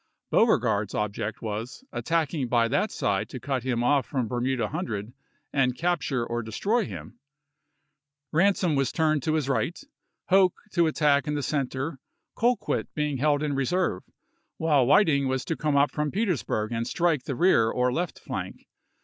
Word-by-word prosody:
Beauregard's 110 - +2
object 105 +1 -3
was, 110 - -5
attacking 160 -4 -1
by 120 -1 +3
that 145 - +1
side 100 -2 -1
to 130 - -7
cut 130 +1 -2
him 120 -1 -1
off 140 +2 +2
from 130 -6 -1
Ber 120 +2 -2
muda 125 -4 0
Hundred 120 - -4 0.4
and 125 -3 +1
capture 155 -7 0
or 120 0 -2
destroy 200 - 0
him. 85 -8 -9 1.1
Ran 190 +5 +4
som 175 -5 0
was 135 -2 +1
to - - -13
turn 155 -2 +3
his 155 -3 0
right, 140 +5 -1 0.5
Hoke 185 -1 +4
to 170 -2 +3
attack 150 -3 +2
in 150 - -1
the 145 - -2
center, 135 0 -2 0.4
Colquitt 240 +2 0
being 150 -2 -1
held 145 +2 +2
in 150 -1 -1
reserve; 140 - 0 0.6
while 145 -6 +3
Whit 205 +8 +6
ing 140 -3 +2
was 130 -1 -1
to 165 - -1
come 150 -2 -1
up 140 +1 +3
from 150 0 -1
Petersburg 165 - -1
and 115 0 -2
strike 165 -6 +1
the 135 - -3
rear 120 -9 +4
or 125 +1 +1
left 175 +3 -2
flank. - - -6
140 Hz, 170 wpm, -26 LUFS, 120-160 Hz, 1.1 s, Whit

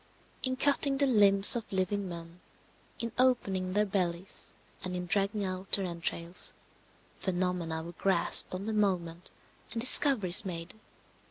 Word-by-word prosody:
In 260 -1 -1
cutting 280 0 +1
the 280 - +4
limbs 205 -3 +7
of 235 - -6
living 190 +1 -2
men, 170 0 -10 0.6
in 230 -1 -5
opening 195 -8 +1
their 210 +1 +1
bellies 185 -2 -2 0.3
and 180 -1 -4
in 180 0 -4
dragging 200 +3 -1
out 185 +1 -6
their 195 - +2
entrails, 170 0 -4 0.6
phenomena 180 -3 -3
were 170 - -9
grasped 185 0 +1
on 190 +2 -6
the 220 - -3
moment 180 -5 -2 0.4
and 230 - -4
discoveries 230 -7 +4
made. 170 -3 -6
190 Hz, 140 wpm, -29 LUFS, 175-210 Hz, 0.6 s, limbs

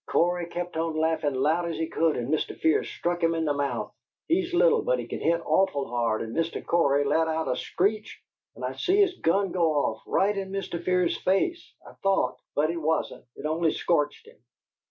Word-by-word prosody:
Cory 175 0 +1
kept 175 -1 -5
on 165 -1 -1
laughin' 155 -3 0
loud 160 +6 +1
as 165 - -4
he 165 - -1
could, 160 0 +1
and 125 +5 -2
Mr. 155 - -1
Fear 160 -1 +2
struck 175 0 -3
him 165 0 +2
in 165 -1 -1
the 145 - +1
mouth. 140 0 -2 0.3
He's 350 +2 +1
little, 460 +6 +4
but - - +1
he - - -4
can - - -5
hit 170 0 +1
awful 165 -8 +1
hard, 115 -2 0
and 115 0 -7
Mr. 165 0 -2
Cory 145 -4 +3
let 155 +3 +2
out 160 -1 -1
a 125 - 0
screech, 210 +10 -1 0.4
and - - -5
I - - -2
see 380 +2 +1
his 375 -3 +3
gun 195 +3 +1
go 170 -3 +2
off 125 -7 0
right 205 +2 +2
in 195 -1 -4
Mr. 195 -3 -4
Fear's 180 -1 +1
face, 335 - 0
I - - -12
thought, 195 -1 +1 0.2
but 155 +2 +2
it 170 - -4
wasn't; 160 +1 -1
it - - -9
only 160 +1 +1
scorched 150 -4 0
him. - - -17
165 Hz, 210 wpm, -26 LUFS, 155-190 Hz, 0.4 s, little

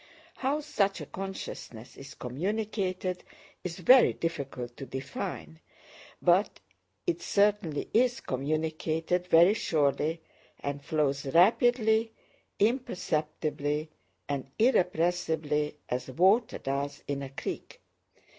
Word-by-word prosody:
How 280 +3 0
such 205 -10 0
a - - -6
consciousness 185 - -7
is 135 +1 -11
communicated 185 - -2 0.4
is 175 -2 -4
very 250 +8 +6
difficult 130 -7 -4
to 135 - -7
define, 105 - -5 0.6
but - - +3 0.5
it 175 0 -1
certainly 200 -5 +1
is 245 +2 +3
communicated 155 +5 -1
very 170 +3 +7
surely, 155 - 0 0.4
and 140 0 -4
flows 140 -3 0
rapidly, 220 - +4 0.4
imperceptibly, 155 - -1 0.4
and 140 -2 -3
irrepressibly, 165 - +1
as 125 +1 -3
water 195 - +3
does 140 +1 -3
in 140 -1 -2
a 135 - -5
creek. 135 - -6
165 Hz, 100 wpm, -29 LUFS, 140-200 Hz, 0.6 s, very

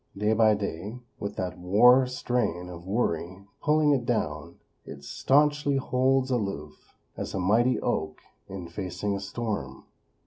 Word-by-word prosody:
Day 105 +2 +2
by 110 -1 +4
day, 100 +2 -5 0.2
with 100 - -4
that 90 -1 -4
war 125 +8 +5
strain 120 -8 -2
of 85 0 -10
worry 95 -3 -2 0.2
pulling 150 0 +3
it 135 -4 +2
down, - - -2 0.3
it 70 0 -10
staunchly 145 - +2
holds 130 0 +1
aloof, 100 - -4 0.2
as - - -5
a - - -1
mighty 115 +7 +3
oak - - -2 0.3
in 95 -3 -7
facing 90 +3 -3
a - - -3
storm. 100 - -5
105 Hz, 140 wpm, -27 LUFS, 90-125 Hz, 0.3 s, war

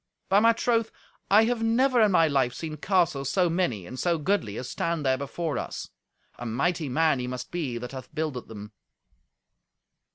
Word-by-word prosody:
By 195 - +5
my 230 +2 +5
troth, 230 -1 +1 0.4
I 210 +3 +6
have 235 0 0
never 240 +2 +3
in 215 -2 +5
my 165 -2 +5
life 135 -4 +1
seen 155 -2 -5
castles 160 -6 +1
so 180 -1 +2
many 145 - -1
and 130 +8 -8
so 170 -2 +1
goodly 150 - -1
as 125 - -5
stand 165 -3 -2
there 130 0 +3
before 140 +3 -3
us. - - -6 0.5
A - - -6
mighty 145 +6 -1
man 155 0 +2
he 125 - -3
must 125 0 -6
be 150 -9 -3
that 125 +1 -6
hath 130 -1 -8
builded 155 -6 -3
them." 105 -1 -9
160 Hz, 185 wpm, -26 LUFS, 130-190 Hz, 0.5 s, I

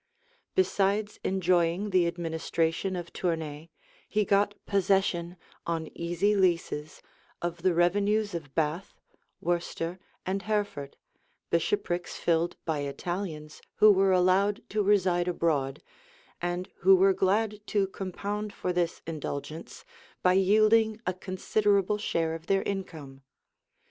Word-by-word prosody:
Besides 205 - +1
enjoying 180 +1 +1
the 180 -2 +4
administration 165 +2 -1
of 175 -1 -6
Tournay, 160 -3 -3 0.4
he 210 -1 +1
got 205 +1 +2
possession, 190 -3 +1 0.3
on 165 -2 -3
easy 175 +5 +1
leases, 170 -5 0 0.4
of 175 0 -4
the 180 -1 +2
revenues 205 +4 +2
of 150 -5 -6
Bath, 160 +4 -2 0.4
Worcester, 175 0 -2 0.3
and 195 +2 -1
Hereford, 205 -10 -2 0.5
bishoprics 175 - -1
filled 170 0 +1
by 160 -3 -1
Italians, 155 +2 -5
who 215 0 +7
were 195 -1 +4
allowed 185 +3 +2
to 210 +1 0
reside 185 -3 +2
abroad, 150 -6 0 0.6
and 175 +1 -2
who 190 +2 +6
were 190 +1 +5
glad 210 +3 +1
to 205 -2 +2
compound 200 +2 -4
for 180 - -2
this 175 -1 -1
indulgence, 155 0 -6 0.4
by 180 - +5
yielding 215 +3 +4
a 180 - 0
considerable 200 +2 +1
share 165 -6 0
of 165 +1 -8
their 195 0 +2
income. 160 -9 -5
180 Hz, 120 wpm, -28 LUFS, 165-200 Hz, 0.6 s, who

